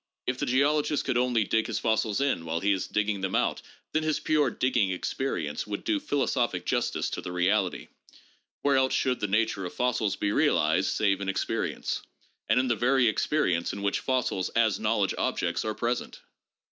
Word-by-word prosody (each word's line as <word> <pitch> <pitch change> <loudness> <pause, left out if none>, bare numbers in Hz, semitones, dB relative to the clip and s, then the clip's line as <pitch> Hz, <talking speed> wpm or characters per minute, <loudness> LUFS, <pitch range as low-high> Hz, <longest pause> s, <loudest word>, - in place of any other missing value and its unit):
If 125 0 -2
the - - -1
geologist 145 +3 +2
could 130 - 0
only 125 -3 +2
dig 110 +2 0
his - - -2
fossils 110 0 0
in 140 -11 0
while 80 0 -2
he 100 +4 +1
is 95 -2 0
digging 105 -2 -1
them 95 -1 -1
out, - - 0 0.3
then 155 - +1
his 155 -1 0
pure 150 -3 +2
digging 120 -5 +1
experience 90 - -3
would 105 -1 -4
do 315 -2 +1
philosophic 145 - -1
justice - - 0
to - - -4
the 90 - -6
reality. 90 +1 0 0.8
Where 140 -1 +3
else 130 0 +2
should 130 -2 +1
the 105 - -1
nature 105 -1 0
of 90 - -6
fossils 115 -5 0
be 100 - -1
realized - - +2
save 100 -2 +1
in 100 - -2
experience, 95 - -2 0.2
— - - -40
and - - +4
in 130 - +1
the 120 - +2
very 125 +2 +3
experience 95 - +1
in 100 - -6
which 100 - +1
fossils 125 -8 -1
as 110 -3 +3
knowledge - - +1
objects - - -1
are 110 -1 -3
present 120 +1 -2
110 Hz, 190 wpm, -27 LUFS, 100-130 Hz, 0.8 s, and